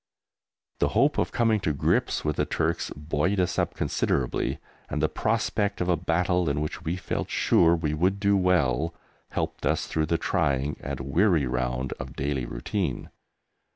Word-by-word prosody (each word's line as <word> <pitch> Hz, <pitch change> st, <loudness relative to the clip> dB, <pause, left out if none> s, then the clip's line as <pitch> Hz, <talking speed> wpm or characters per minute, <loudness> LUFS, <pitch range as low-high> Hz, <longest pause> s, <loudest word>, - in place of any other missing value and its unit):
The -, -, +3 dB
hope -, -, +4 dB
of -, -, 0 dB
coming 115 Hz, -2 st, +2 dB
to 80 Hz, -6 st, 0 dB
grips 70 Hz, -, +1 dB
with 75 Hz, -1 st, 0 dB
the -, -, +2 dB
Turks -, -, -1 dB
buoyed 75 Hz, +6 st, 0 dB
us 90 Hz, -, +1 dB
up -, -, -1 dB
considerably, 65 Hz, -3 st, 0 dB, 0.3 s
and 75 Hz, -, -2 dB
the 80 Hz, -, +3 dB
prospect 105 Hz, -1 st, 0 dB
of 90 Hz, -, -1 dB
a 90 Hz, -, +4 dB
battle 90 Hz, +1 st, +1 dB
in 70 Hz, +1 st, 0 dB
which 75 Hz, +3 st, -3 dB
we 80 Hz, +2 st, -1 dB
felt 95 Hz, -, -3 dB
sure 85 Hz, 0 st, +4 dB
we 80 Hz, -3 st, -1 dB
would 95 Hz, +6 st, +1 dB
do 100 Hz, 0 st, +3 dB
well 85 Hz, -5 st, +2 dB, 0.3 s
helped -, -, -3 dB
us -, -, +1 dB
through 80 Hz, -1 st, -1 dB
the 85 Hz, -, +1 dB
trying 75 Hz, -6 st, 0 dB
and -, -, -5 dB
weary 80 Hz, +2 st, +2 dB
round 65 Hz, +1 st, -1 dB
of 65 Hz, 0 st, -7 dB
daily 70 Hz, -3 st, -2 dB
routine. 65 Hz, -, -3 dB
80 Hz, 170 wpm, -26 LUFS, 70-90 Hz, 0.3 s, hope